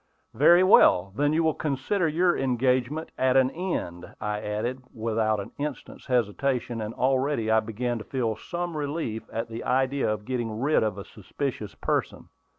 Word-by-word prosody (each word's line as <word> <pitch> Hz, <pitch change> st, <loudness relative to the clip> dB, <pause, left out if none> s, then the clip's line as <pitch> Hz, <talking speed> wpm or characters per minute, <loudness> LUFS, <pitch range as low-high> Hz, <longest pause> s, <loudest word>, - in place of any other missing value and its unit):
"Very 170 Hz, +6 st, +6 dB
well; 95 Hz, -, +5 dB
then 145 Hz, +4 st, +2 dB
you 160 Hz, +2 st, +2 dB
will 160 Hz, -1 st, +2 dB
consider 155 Hz, +7 st, -1 dB
your 175 Hz, +3 st, +2 dB
engagement 130 Hz, +4 st, 0 dB
at 130 Hz, 0 st, +3 dB
an 130 Hz, 0 st, +4 dB
end," 90 Hz, -, -4 dB
I 105 Hz, 0 st, -3 dB
added, 110 Hz, +5 st, -3 dB
without 110 Hz, -1 st, 0 dB
an 100 Hz, -, -7 dB
instant's 145 Hz, -1 st, -6 dB
hesitation; 125 Hz, 0 st, 0 dB
and 110 Hz, +1 st, -5 dB
already 130 Hz, -3 st, +1 dB
I 110 Hz, -, +5 dB
began 115 Hz, +2 st, -3 dB
to -, -, -7 dB
feel 115 Hz, -4 st, -2 dB
some 175 Hz, +8 st, -5 dB
relief 145 Hz, -6 st, -3 dB
at 115 Hz, +1 st, -3 dB
the 115 Hz, 0 st, -6 dB
idea 135 Hz, +1 st, +1 dB
of 105 Hz, -1 st, -4 dB
getting 120 Hz, -4 st, -3 dB
rid 145 Hz, +5 st, +2 dB
of 105 Hz, -3 st, -1 dB
a 100 Hz, -, -7 dB
suspicious 110 Hz, +1 st, -5 dB
person. -, -, -2 dB
125 Hz, 165 wpm, -26 LUFS, 110-145 Hz, -, Very